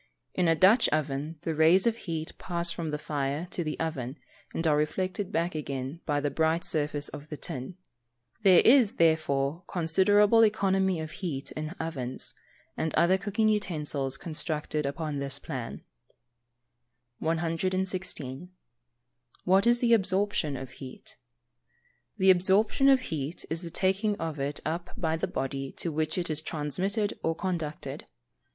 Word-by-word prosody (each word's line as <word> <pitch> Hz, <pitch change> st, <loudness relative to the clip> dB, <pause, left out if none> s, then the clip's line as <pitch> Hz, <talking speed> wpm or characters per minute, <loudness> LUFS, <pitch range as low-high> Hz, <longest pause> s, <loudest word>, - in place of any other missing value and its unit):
In 180 Hz, -2 st, +1 dB
a 165 Hz, -, +4 dB
Dutch 190 Hz, +9 st, +5 dB
oven 155 Hz, +1 st, -2 dB
the 165 Hz, -, -2 dB
rays 160 Hz, +5 st, +5 dB
of 230 Hz, -1 st, +2 dB
heat 165 Hz, -7 st, -4 dB
pass 170 Hz, -1 st, +3 dB
from 170 Hz, -2 st, -4 dB
the 150 Hz, -, -2 dB
fire 145 Hz, +2 st, -2 dB
to 175 Hz, -, -2 dB
the 155 Hz, -1 st, -4 dB
oven, 140 Hz, -4 st, -3 dB, 0.3 s
and 165 Hz, -, -3 dB
are 155 Hz, -2 st, +4 dB
reflected 185 Hz, +5 st, -1 dB
back 170 Hz, +2 st, 0 dB
again 140 Hz, 0 st, -4 dB
by 145 Hz, -2 st, +1 dB
the 145 Hz, 0 st, -1 dB
bright 160 Hz, +3 st, +1 dB
surface 150 Hz, -1 st, -1 dB
of 145 Hz, +1 st, -10 dB
the 150 Hz, -, -6 dB
tin. 130 Hz, +8 st, -6 dB, 0.6 s
There 190 Hz, -4 st, +7 dB
is, 240 Hz, -4 st, +6 dB
therefore, 155 Hz, -1 st, +1 dB
considerable 200 Hz, +6 st, +4 dB
economy 195 Hz, -4 st, +2 dB
of 155 Hz, -1 st, -6 dB
heat 150 Hz, -5 st, -5 dB
in 155 Hz, 0 st, -4 dB
ovens, 130 Hz, -6 st, -4 dB, 0.4 s
and 160 Hz, -, -2 dB
other 185 Hz, +2 st, +4 dB
cooking 210 Hz, +3 st, 0 dB
utensils 150 Hz, -10 st, -1 dB
constructed 155 Hz, -2 st, -3 dB
upon 150 Hz, 0 st, -3 dB
this 140 Hz, 0 st, -3 dB
plan. 130 Hz, -6 st, -6 dB, 1.4 s
116. 175 Hz, -2 st, -2 dB, 0.9 s
What 195 Hz, +4 st, +4 dB
is 240 Hz, 0 st, +4 dB
the 235 Hz, -1 st, +4 dB
Absorption 190 Hz, -7 st, +1 dB
of 130 Hz, 0 st, -7 dB
heat? 130 Hz, -1 st, -10 dB, 1.0 s
The 190 Hz, -1 st, +6 dB
absorption 200 Hz, +9 st, +4 dB
of 265 Hz, -1 st, +5 dB
heat 155 Hz, -, -4 dB
is 165 Hz, +1 st, +1 dB
the 170 Hz, -, -4 dB
taking 195 Hz, +4 st, +1 dB
of 160 Hz, -5 st, -4 dB
it 140 Hz, +2 st, -3 dB
up 170 Hz, +3 st, -4 dB
by 160 Hz, -2 st, 0 dB
the 165 Hz, -, -2 dB
body 135 Hz, 0 st, -3 dB
to 170 Hz, -, -3 dB
which 155 Hz, +2 st, -1 dB
it 175 Hz, -3 st, -1 dB
is 155 Hz, 0 st, 0 dB
transmitted 185 Hz, +8 st, -2 dB
or 165 Hz, 0 st, 0 dB
conducted. 165 Hz, -5 st, -4 dB
165 Hz, 150 wpm, -28 LUFS, 150-190 Hz, 1.4 s, There